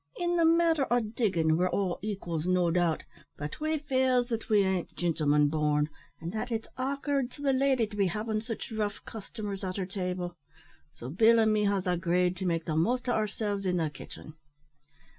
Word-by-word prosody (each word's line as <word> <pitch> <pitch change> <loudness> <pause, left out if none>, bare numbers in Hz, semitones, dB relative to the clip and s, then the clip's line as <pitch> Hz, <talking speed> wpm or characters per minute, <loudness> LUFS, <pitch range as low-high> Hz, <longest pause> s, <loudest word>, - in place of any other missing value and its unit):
In 350 0 0
the 335 -1 +4
matter 330 -3 +4
o' 245 - +4
diggin' 200 -8 +1
we're 180 +1 +2
all 190 -3 -1
equals, 180 -6 -3
no 180 -2 +3
doubt; 170 -2 +1 0.3
but 150 - -6
we 310 +1 0
feels 260 -4 +1
that 230 -2 -3
we 210 -2 +5
ain't 190 -2 -1
gintlemen 150 -4 +2
born, 150 -1 +1 0.3
and 165 +1 -5
that 220 +3 -3
it's 225 -1 -2
a'k'ard 275 0 -1
to 290 - -10
the 275 -1 +3
lady 260 -3 +3
to 210 0 -10
be 200 -2 +2
havin' 215 +4 -2
sich 225 +1 -6
rough 210 -2 -2
customers 210 -3 -6
at 185 0 -3
her 190 - -1
table, 180 -2 -4 0.6
so 120 - -8
Bill 225 - +5
an' 220 -1 +4
me 210 -1 +2
has 200 -1 +1
agreed 180 0 +1
to 190 - -2
make 165 -2 0
the 155 - -2
most 245 +11 +1
o' - - +2
ourselves 210 -2 -1
in 180 -2 0
the 160 -3 0
kitchen." 150 +2 -10
200 Hz, 195 wpm, -29 LUFS, 175-240 Hz, 0.6 s, we